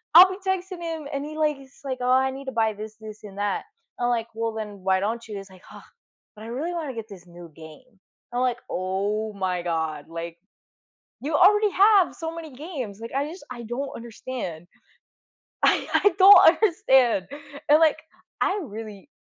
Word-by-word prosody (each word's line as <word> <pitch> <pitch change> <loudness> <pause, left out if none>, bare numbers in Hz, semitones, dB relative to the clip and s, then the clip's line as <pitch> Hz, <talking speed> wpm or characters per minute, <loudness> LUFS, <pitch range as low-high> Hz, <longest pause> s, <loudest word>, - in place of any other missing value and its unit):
I'll 370 +2 +11
be 375 - -5
texting 370 -1 -2
him, 325 -3 -5
and 280 +1 -3
he 310 +1 -7
like 300 -2 +1
he's 270 0 -17
like, 260 -2 -3
"Oh, 250 - 0
I 265 +1 +3
need 270 +1 -8
to 265 - -4
buy 220 -1 +2
this, 215 +1 -8
this, 215 0 -10
and 200 -1 -11
that." 205 -1 -1 0.3
I'm 240 - +1
like, 230 -1 0
"Well, 225 0 -2
then, 210 -2 -6
why 190 0 +2
don't 230 +3 -1
you?" 210 - -7
He's 195 0 -9
like, 185 -1 -17
"Huh, - - -12 0.5
but 215 - -11
I - - -8
really 295 +9 -3
wanna 310 -6 -4
get 225 -1 -7
this 180 -3 -12
new 175 -1 -12
game." 185 +8 -14 0.3
I'm 245 - -1
like, 250 -1 0
"Oh 205 +4 -2
my 185 -3 -2
god, 160 -3 -2
like, 165 0 -6 0.8
you 295 +3 -3
already 415 +3 +5
have 400 -1 +5
so 325 0 -5
many 325 -2 -8
games." 260 - -6
Like, 230 - -8
I 280 +2 -1
just, 350 +4 -10
I 240 -1 -8
don't 265 +5 -4
understand. 230 -7 -7 1.0
I - - +3
I 410 - +5
don't 390 0 +10
understand. 265 - +3 0.4
And, 300 +2 +7
like, 315 -1 +4 0.4
I 395 +2 +1
really 215 0 -9
240 Hz, 195 wpm, -25 LUFS, 205-310 Hz, 1.0 s, I'll